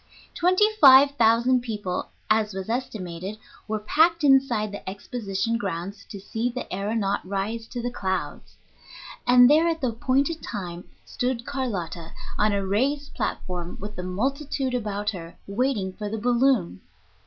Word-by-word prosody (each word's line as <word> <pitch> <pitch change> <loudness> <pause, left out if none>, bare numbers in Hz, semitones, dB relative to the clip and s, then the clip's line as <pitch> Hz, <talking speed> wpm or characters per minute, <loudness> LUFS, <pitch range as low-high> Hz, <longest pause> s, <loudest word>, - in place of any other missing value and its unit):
Twenty 370 +4 +4
five 275 -4 +8
thousand 240 0 +3
people, 210 -6 -4 0.2
as 215 -2 +1
was 190 +2 -5
estimated, 200 -5 -4 0.3
were 215 0 -1
packed 320 +10 +2
inside 265 -7 +3
the 200 -2 -6
Exposition 210 +2 -3
grounds 195 0 -5
to 200 - -9
see 225 +5 -2
the 250 +1 -4
aëronaut 200 +1 -1
rise 200 +4 -3
to 240 0 -6
the 245 - -2
clouds. 190 -5 -4 0.7
And 245 0 +8
there 310 +5 +5
at 330 -1 0
the 255 - +1
appointed 270 +7 0
time 180 -4 -6 0.2
stood 245 -1 -2
Carlotta 190 - -4 0.3
on 210 0 +3
a 200 -1 -1
raised 275 +9 0
platform, 175 -1 -4
with 210 +2 -7
the - - -4
multitude 265 +8 -2
about 210 -4 -1
her, 170 -4 -9
waiting 200 -3 -1
for 210 +1 -5
the 220 - -3
balloon. 240 - +2
220 Hz, 145 wpm, -25 LUFS, 195-255 Hz, 0.7 s, five